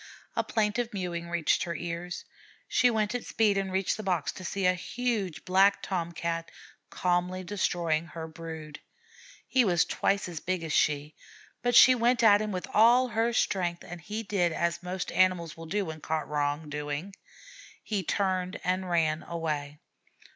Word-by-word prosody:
A - - +1
plaintive 225 +2 0
mewing 170 -3 -4
reached 170 -2 +1
her 170 -1 -4
ears. 170 +2 -5 0.4
She 250 - +4
went 215 -2 0
at 245 - -2
speed 215 -2 +2
and 195 -1 -1
reached 190 +1 0
the - - -4
box 180 -7 0
to 185 - -10
see 195 +2 -2
a 180 - +5
huge 210 -2 -3
Black 195 +2 +4
Tom 170 -3 -2
cat 165 0 -3 0.4
calmly 180 +1 0
destroying 170 -4 0
her 165 -1 -7
brood. 160 -2 -8 0.7
He 255 - +4
was 175 -5 +3
twice 200 0 0
as 170 -3 -6
big 185 +1 -2
as 160 -2 -3
she, 150 +1 +1 0.5
but 245 0 +1
she 255 - +9
went 240 0 +2
at 205 -2 +7
him 215 -1 -2
with 185 -2 -4
all 240 +4 +5
her 230 +1 +1
strength, 175 -6 0
and 175 0 -8
he 215 +6 -5
did 190 -5 +1
as 170 +1 -1
most 180 0 -4
animals 185 -3 +2
will 165 0 -9
do 200 +3 -1
when 160 -2 -7
caught 155 0 -2
wrong 145 +1 -1
doing, 150 +5 -4 0.7
he 210 -3 -1
turned 185 0 -1
and 185 0 -1
ran 160 -2 +1
away. 150 -3 -4
180 Hz, 170 wpm, -29 LUFS, 165-205 Hz, 0.7 s, she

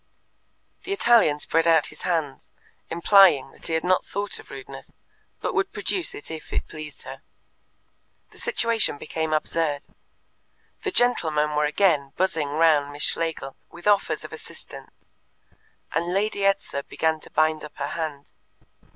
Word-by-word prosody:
The 390 - -3
Italian 235 - +4
spread 165 +2 +1
out 160 -3 +5
his - - -14
hands, 160 -6 -2 0.4
implying 170 -5 +5
that - - -8
he 165 - -2
had 160 - 0
not 185 +1 +2
thought 200 +1 -3
of - - -14
rudeness, - - -10 0.4
but - - -2
would 390 - 0
produce 375 +1 -1
it 415 - -9
if 160 - -8
it - - -2
pleased 155 -2 -9
her. 130 +1 -9 1.1
The - - -15
situation 230 - +1
became 160 +1 -3
absurd. 155 -1 0 1.0
The 395 - -1
gentlemen 155 - +2
were 150 0 +2
again 150 -4 +2
buzzing 165 -6 0
round 150 -1 +3
Miss 145 +1 -3
Schlegel 160 -5 0
with 170 - -13
offers 205 -1 +2
of - - -9
assistance, - - -10 1.0
and 170 +1 -1
Lady 200 +2 0
Edser 195 -7 0
began 160 -1 0
to - - -13
bind 155 0 +1
up 150 - -10
her 140 +1 -3
hand. 155 -4 -5
160 Hz, 150 wpm, -24 LUFS, 150-195 Hz, 1.1 s, out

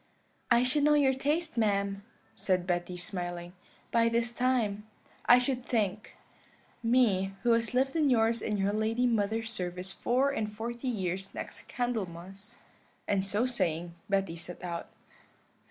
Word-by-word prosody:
"'I 240 0 +5
should 260 +4 +1
know 300 0 +5
your 275 -2 +4
taste, 300 +3 -1
ma'am,' 200 -2 +1 0.3
said 180 -2 0
Betty, 180 0 -1
smiling, 175 -1 -5 0.4
'by 230 0 +4
this 235 +1 +1
time, 230 -5 0 0.4
I 245 - +9
should 250 0 0
think 210 -4 -1 0.7
me 215 -6 +2
who 240 - +4
has 230 +1 +1
lived 265 +2 +2
in 305 -3 +3
yours 230 -1 +3
and 210 -1 -1
your 200 +1 +1
lady 220 +3 +1
mother's 225 0 0
service 180 -2 -4
four 255 +7 +1
and 215 -5 -2
forty 235 +4 -5
years 190 -4 -2
next - - -6
Candlemas;' 200 -3 -4 0.5
and 195 -1 +1
so 210 +5 +1
saying 175 -8 -1 0.2
Betty 195 -4 +1
set 170 +2 -8
out." 170 -1 -4
220 Hz, 145 wpm, -30 LUFS, 190-245 Hz, 0.7 s, I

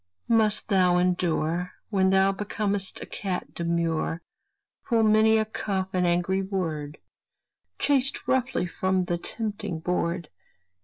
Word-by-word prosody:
must 215 -2 +3
thou 180 -3 +4
endure, 180 -1 0 0.2
When 190 -2 +3
thou 190 0 +4
becom'st 200 -1 -2
a - - -7
cat 190 -3 -4
demure, 170 -1 -1 0.7
Full 230 -2 +3
many 220 +1 +5
a 220 - +2
cuff 190 -3 -3
and 180 -1 +2
angry 175 +2 +1
word, 165 -7 -3 0.8
Chased 275 -2 +1
roughly 260 -7 +1
from 185 +1 0
the 175 -1 -2
tempting 205 -4 -4
board. 170 0 -2
190 Hz, 120 wpm, -26 LUFS, 175-210 Hz, 0.8 s, many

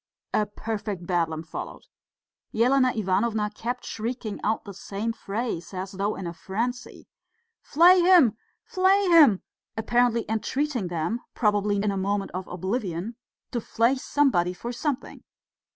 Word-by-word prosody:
A 210 - +2
perfect 205 -3 -5
Bedlam 165 -3 -1
followed. 165 - -7 0.7
Elena 255 +3 +4
Ivanovna 210 +1 0
kept 245 +4 -4
shrieking 225 -1 -4
out 220 +1 0
the 200 - -8
same 205 +4 -4
phrase, 210 -4 -4
as 190 +1 -4
though 200 +2 -2
in 190 - -6
a 170 - -4
frenzy, 235 +8 -4 0.5
"Flay 350 +4 +6
him! 345 - +6 0.3
flay 380 +1 +3
him!" 295 - +6 0.3
apparently 235 +1 +2
entreating 245 +1 -1
them 175 +7 -2
probably 205 -2 +2
in 200 +1 0
a 195 - -3
moment 195 +1 -1
of 185 0 -5
oblivion 190 +2 -3 0.4
to 240 - -2
flay 230 +3 +2
somebody 260 -10 +1
for 235 +6 -6
something. 275 +2 -4
220 Hz, 135 wpm, -26 LUFS, 195-245 Hz, 0.7 s, Flay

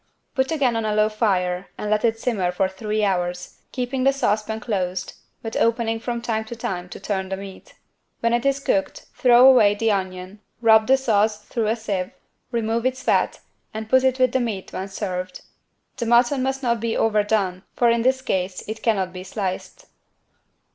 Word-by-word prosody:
Put 265 +1 0
again 270 -7 +1
on 225 - -1
a 215 -1 -1
low 215 0 +3
fire 185 -4 0
and 210 - -3
let 210 0 +2
it 225 -1 +1
simmer 205 -8 0
for 190 +1 +1
three 210 +3 -2
hours, 180 -2 -2
keeping 255 0 -2
the 270 - +5
saucepan 220 -4 -1
closed, 185 -5 -3 0.3
but 225 -1 -5
opening 230 -1 +1
from 235 0 -4
time 220 -2 -1
to 235 - -7
time 180 -5 -4
to - - -9
turn 190 -2 -3
the 190 - -3
meat. 195 -1 -11 0.4
When 230 0 +1
it 240 - +1
is 275 0 +1
cooked, 195 -8 -1
throw 250 0 +6
away 220 -6 +6
the 225 +1 +1
onion, 185 0 -4 0.2
rub 220 -1 +5
the 265 +1 +5
sauce 215 -4 +1
through 225 -1 -2
a 220 - +2
sieve, 200 -5 -3 0.4
remove 230 -1 -1
its 255 0 -1
fat - - +1 0.3
and 220 0 -4
put 260 0 +5
it 260 -1 +2
with 255 -2 +3
the 260 - +1
meat 220 -6 -4
when 190 - -4
served. 185 -2 -5 0.6
The 235 - -2
mutton 240 +3 +4
must 265 +1 -2
not 235 -2 +1
be 230 +1 -1
overdone, 210 -4 +1
for 240 -1 +4
in 235 0 +1
this 260 +2 +1
case 185 -4 -2
it 220 +1 -6
cannot 195 -5 0
be 185 0 -7
sliced. 195 - -5
220 Hz, 190 wpm, -23 LUFS, 195-240 Hz, 0.6 s, throw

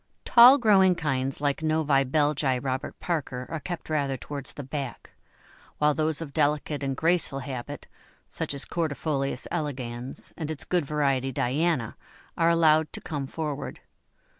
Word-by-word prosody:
Tall 250 +3 +9
growing 195 -7 +5
kinds 135 -4 -1
like 145 0 0
Novi 155 -3 +2
Belgi 145 -1 +1
Robert 130 +1 -4
Parker 135 -7 -3
are 160 - -3
kept 175 +2 -6
rather 140 -4 -1
towards 140 +1 -7
the 145 - -7
back, 135 -1 -6 0.7
while 150 0 +3
those 155 0 0
of 145 -4 -7
delicate 150 -1 0
and 135 -1 -2
graceful 165 -4 +2
habit, 130 -2 -6 0.4
such - - -3
as 140 - -2
Cordifolius 145 -5 -2
elegans 130 -6 -5
and 155 -3 -5
its 155 -3 -3
good 175 -4 +1
variety 135 -3 0
Diana 135 0 0 0.4
are 165 0 +3
allowed 160 -2 +4
to - - -4
come 145 -3 -4
forward. 150 -1 -5
145 Hz, 145 wpm, -26 LUFS, 135-160 Hz, 0.7 s, Tall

